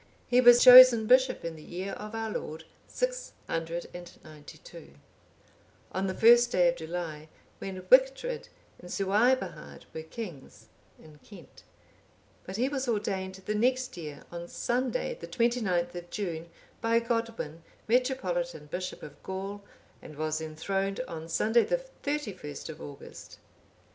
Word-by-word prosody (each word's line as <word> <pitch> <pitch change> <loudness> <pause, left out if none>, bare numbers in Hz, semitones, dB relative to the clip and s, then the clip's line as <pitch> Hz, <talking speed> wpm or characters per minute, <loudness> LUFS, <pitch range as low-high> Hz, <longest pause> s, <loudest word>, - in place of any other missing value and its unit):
He 250 +1 +4
was 245 -1 +8
chosen 250 -3 +10
bishop 255 -4 +3
in 165 -1 -4
the 155 - -12
year 185 +5 -6
of 210 +1 -7
our 225 -1 -3
Lord 160 -5 -5 0.2
692,(809) 165 - -6 1.0
on 190 +1 -2
the 190 - -3
first 240 +1 +6
day 175 -4 +4
of 170 - -1
July, 160 -2 -6 0.3
when 185 -1 -6
Wictred 265 - +3 0.3
and 180 - -12
Suaebhard 210 +8 0
were 160 - -5
kings 165 - -9 0.3
in 150 -1 -17
Kent;(810) 185 -2 -15 0.8
but 190 - -6
he 245 +5 +1
was 270 -1 -3
ordained 195 -4 -2
the 210 - -1
next 255 +3 0
year, 150 -4 -8
on 170 0 -7
Sunday 255 - -2
the - - -8
29th 215 -8 0
of 175 0 -8
June, 170 -5 -4 0.3
by 230 0 +3
Godwin, 230 -9 -3 0.3
metropolitan 180 - 0
bishop 180 +5 -6
of 145 - -11
Gaul,(811) 195 +2 -6 0.4
and 150 - -12
was 155 0 -2
enthroned 195 +6 -3
on 165 -9 -7
Sunday 225 +7 +3
the - - 0 0.2
31st 205 - -4
of 160 - -9
August. 145 -1 -11
195 Hz, 135 wpm, -29 LUFS, 165-240 Hz, 1.0 s, chosen